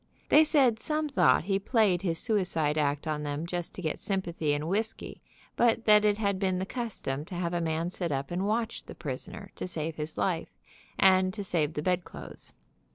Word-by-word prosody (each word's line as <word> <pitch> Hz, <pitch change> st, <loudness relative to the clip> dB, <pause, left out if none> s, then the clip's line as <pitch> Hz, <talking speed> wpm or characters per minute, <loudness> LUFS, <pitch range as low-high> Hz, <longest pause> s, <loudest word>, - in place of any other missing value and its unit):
They 310 Hz, -, +8 dB
said 270 Hz, -8 st, +3 dB
some 305 Hz, +4 st, -1 dB
thought 130 Hz, -, +4 dB
he 195 Hz, +2 st, 0 dB
played 200 Hz, -4 st, +2 dB
his 170 Hz, -4 st, -1 dB
suicide 170 Hz, -8 st, 0 dB
act 145 Hz, -1 st, 0 dB
on 155 Hz, -1 st, -2 dB
them 145 Hz, +2 st, -3 dB
just 175 Hz, 0 st, -4 dB
to 185 Hz, -, -7 dB
get 155 Hz, -, -2 dB
sympathy 175 Hz, -6 st, -1 dB
and 145 Hz, +2 st, -1 dB
whisky, 215 Hz, +5 st, -2 dB, 0.3 s
but 235 Hz, -1 st, +2 dB
that 210 Hz, -1 st, +6 dB
it 205 Hz, -1 st, +3 dB
had 200 Hz, -3 st, 0 dB
been 190 Hz, -2 st, +1 dB
the 185 Hz, -, -2 dB
custom 195 Hz, -, -4 dB
to 180 Hz, -, -8 dB
have 175 Hz, -1 st, -2 dB
a 175 Hz, -, 0 dB
man 165 Hz, +1 st, -1 dB
sit 175 Hz, -3 st, -3 dB
up 135 Hz, +1 st, -2 dB
and 185 Hz, +3 st, -1 dB
watch 225 Hz, +1 st, -1 dB
the -, -, -10 dB
prisoner 170 Hz, +6 st, -6 dB
to -, -, -4 dB
save 165 Hz, -2 st, -4 dB
his 150 Hz, 0 st, -5 dB
life, 170 Hz, -4 st, -1 dB, 0.4 s
and 185 Hz, -1 st, +4 dB
to 205 Hz, -, -4 dB
save 160 Hz, -5 st, 0 dB
the 150 Hz, -, -2 dB
bedclothes. 180 Hz, 0 st, -3 dB
180 Hz, 200 wpm, -29 LUFS, 160-210 Hz, 0.4 s, They